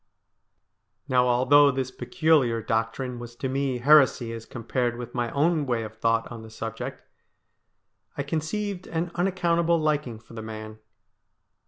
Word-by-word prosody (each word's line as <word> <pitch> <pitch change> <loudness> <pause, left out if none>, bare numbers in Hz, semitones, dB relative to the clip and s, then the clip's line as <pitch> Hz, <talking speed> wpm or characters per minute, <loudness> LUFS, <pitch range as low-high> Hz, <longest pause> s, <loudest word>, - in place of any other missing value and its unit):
Now, 125 -1 +3
although 130 +4 +5
this 130 -1 -2
peculiar 130 -2 +2
doctrine 115 +3 -2
was 120 0 -9
to 130 - -3
me 135 -1 -1
heresy 130 -3 +4
as 115 0 -8
compared 120 0 -2
with 120 0 -7
my 120 -2 -1
own 150 +2 +1
way 120 -2 0
of 110 0 -8
thought 115 0 +1
on 115 -1 -7
the 110 - -11
subject, 115 0 -6 1.1
I 140 - -1
con 155 +3 -1
ceived 195 +4 -4
an 165 +1 -2
unaccountable 170 -2 +1
liking 150 -6 -1
for 115 +1 -17
the 115 - -6
man. 110 0 -8
125 Hz, 150 wpm, -26 LUFS, 115-150 Hz, 1.1 s, although